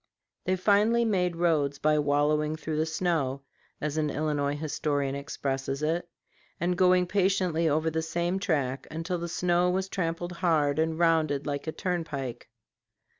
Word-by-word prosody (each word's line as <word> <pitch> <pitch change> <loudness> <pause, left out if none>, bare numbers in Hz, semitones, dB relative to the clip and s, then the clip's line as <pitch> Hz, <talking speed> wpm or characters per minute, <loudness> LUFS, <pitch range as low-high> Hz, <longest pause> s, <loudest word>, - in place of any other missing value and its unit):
They 185 - +2
finally 210 +5 +3
made 180 -5 +1
roads 155 -5 +1
by 150 +1 +2
"wallowing 150 +1 +1
through 155 -1 -4
the 155 +1 +1
snow," 160 -5 -1 0.4
as 150 0 -3
an 155 -1 +1
Illinois 145 -1 -1
historian 145 -2 -1
expresses 135 0 -3
it, 170 +3 -1 0.5
and 180 +1 +1
going 180 0 +4
patiently 185 -3 +1
over 155 +2 +1
the 160 +1 -1
same 170 +3 -1
track 140 -9 -1
until 165 +3 -3
the 170 0 -4
snow 175 +1 +2
was 190 +1 0
trampled 175 -1 -2
hard 160 -5 +1
and 160 0 0
rounded 160 -4 +2
like 145 +1 -3
a - - 0
turnpike. 140 -11 -4
160 Hz, 150 wpm, -28 LUFS, 145-175 Hz, 0.5 s, going